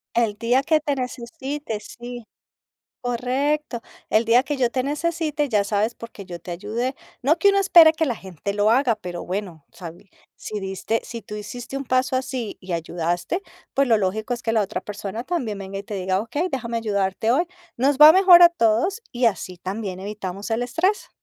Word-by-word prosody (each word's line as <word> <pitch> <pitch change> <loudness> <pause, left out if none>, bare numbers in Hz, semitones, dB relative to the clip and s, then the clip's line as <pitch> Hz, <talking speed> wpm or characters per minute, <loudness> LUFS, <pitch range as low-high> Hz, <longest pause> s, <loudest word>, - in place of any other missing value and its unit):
El 230 -3 +2
día 250 +4 +2
que 315 -1 +3
te 285 -2 -1
necesite, 255 0 -5
sí, 240 +2 -9 0.8
correcto. 255 +2 -1 0.3
El 220 +2 +3
día 235 +3 +4
que 290 +1 -2
yo 250 -3 +1
te 255 - 0
necesite, 300 0 -1
ya 205 -3 +2
sabes, 210 +3 0
porque 230 -3 -10
yo 175 -1 -8
te 175 +2 -9
ayudé. 225 +9 -3 0.3
No 305 +6 +3
que 400 +5 +5
uno 395 0 +3
espere 340 -4 +8
que 320 0 -1
la 245 -5 -1
gente 190 +1 -6
lo 205 +1 +2
haga, 245 -2 +3
pero 180 -4 -7
bueno, 180 -5 -5
sabi 175 +2 -11 0.3
si 210 -1 -5
diste, 195 +4 -2
si 230 -1 -7
tú 210 - -8
hiciste 240 +5 -7
un 275 - -4
paso 255 +1 +1
así 255 -3 -3
y 185 -1 -8
ayudaste, 175 - -2 0.3
pues, 275 -1 +2
lo 225 - +5
lógico 215 +5 -1
es 240 - -11
que 225 - 0
la 220 - +3
otra 200 - -3
persona 205 +2 -6
también 245 - -2
venga, 195 0 -6
y - - -7
te 205 - -6
diga: 185 0 0
"Okey, 290 +11 -2
déjame 235 -3 -2
ayudarte 200 -1 -1
hoy". 335 +8 +2 0.3
Nos 270 +3 +2
va 305 +2 +10
mejor 370 -2 +8
a - - +11
todos 295 - +1
y 245 -1 0
así 185 -4 -1
también 190 0 -5
evitamos 200 0 -6
el 225 +2 0
estrés. 360 - 0
230 Hz, 195 wpm, -23 LUFS, 200-275 Hz, 0.8 s, a